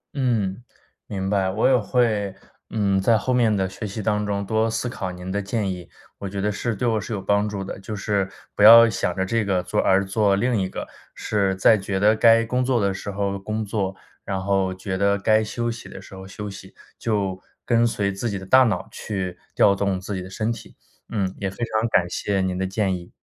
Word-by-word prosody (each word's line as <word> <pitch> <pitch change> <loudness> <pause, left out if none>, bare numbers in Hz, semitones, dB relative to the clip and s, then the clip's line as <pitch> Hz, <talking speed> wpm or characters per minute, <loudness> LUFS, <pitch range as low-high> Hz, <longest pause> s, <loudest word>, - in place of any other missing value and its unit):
嗯， 115 -6 0 0.4
明 95 -2 -3
白。 95 -2 +1
我 100 +4 +2
也 130 - +5
会， 110 -3 +1 0.4
嗯， 100 -3 +1
在 115 +3 +4
后 130 +4 -1
面 115 -4 +3
的 95 -1 0
学 95 +3 -6
习 100 +2 -6
当 105 0 0
中 100 0 -2
多 110 +2 +1
思 115 - -2
考 95 -6 -4
您 90 +1 -7
的 100 +2 -1
建 100 0 -2
议， 90 -2 -8 0.3
我 100 - -5
觉 100 +1 -5
得 105 +2 0
是 115 +3 -2
对 120 +5 -1
我 110 -2 +1
是 105 - -5
有 105 - -2
帮 100 +2 +1
助 100 -2 -4
的， 95 - -7
就 105 +2 -6
是 100 -2 -1 0.2
不 - - -4
要 115 +2 +10
想 90 -5 -1
着 95 - 0
这 115 +3 0
个 95 -3 0
做 - - 0
而 95 +1 +3
做 100 0 +2
另 120 +4 +1
一 95 - -2
个。 - - -6 0.3
是 100 -3 0
在 95 +4 +5
觉 95 0 -2
得 105 +2 +4
该 115 0 +5
工 125 +3 0
作 125 -1 +1
的 100 -2 +1
时 95 - -6
候 100 0 -2
工 110 +2 -3
作， 100 -2 -2 0.3
然 95 -1 -3
后 95 -1 0
觉 95 0 -4
得 100 0 +3
该 110 +2 +3
休 120 +2 -2
息 115 - -9
的 - - -9
时 - - -14
候 95 0 -9
休 105 +2 -7
息， 95 -1 -10 0.2
就 100 -4 -1 0.2
跟 120 -1 +3
随 100 -3 -1
自 105 +5 -3
己 100 - -3
的 95 - -8
大 130 +7 +6
脑 110 - -1
去 95 -4 -5 0.2
调 100 - +5
动 100 -1 -1
自 95 +2 -6
己 95 - -3
的 90 - -8
身 110 +4 -2
体。 115 - -12 0.3
嗯， 95 -4 -1
也 95 - -2
非 95 - -12
常 110 0 0
感 90 -5 +3
谢 100 +2 -1
您 95 -1 -1
的 95 +1 -1
建 95 -1 0
议。 85 -1 -10
100 Hz, 250 characters per minute, -23 LUFS, 95-110 Hz, 0.4 s, 要